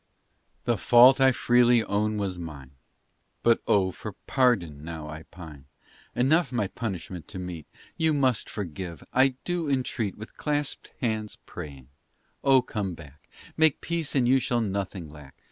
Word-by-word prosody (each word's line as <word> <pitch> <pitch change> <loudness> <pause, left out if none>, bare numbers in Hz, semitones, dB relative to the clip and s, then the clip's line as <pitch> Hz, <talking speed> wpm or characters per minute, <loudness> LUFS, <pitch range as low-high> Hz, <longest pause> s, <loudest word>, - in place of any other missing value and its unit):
The 120 -4 0
fault 125 +5 +7
I 135 0 +7
freely 120 -1 +4
own 105 +1 0
was 95 -3 -3
mine. 70 -6 -8 0.7
But 115 -1 +4
oh, 95 -2 +3
for - - -8
pardon 90 - +1
now 80 -2 -6
I 80 +1 -7
pine! 75 -6 -11 0.5
Enough 135 +3 +3
my 120 -5 0
punishment 95 -5 -5
to - - -8
meet, 90 -4 -6 0.3
You 160 -1 +2
must 130 -6 +1
forgive, 90 -3 -6
I 130 0 +4
do 175 -4 -2
entreat 125 -6 -1
With 110 - -11
clasped 150 -1 -2
hands 110 -4 -2
praying 70 -6 -9 0.5
oh, 135 -2 +5
come 100 -7 -3
back, 75 -3 -15 0.3
Make 160 -3 +4
peace, 170 -3 -2
and 125 -3 +3
you 130 +2 +5
shall 120 -1 0
nothing 100 -4 -3
lack. 75 -3 -13
105 Hz, 150 wpm, -27 LUFS, 85-130 Hz, 0.7 s, fault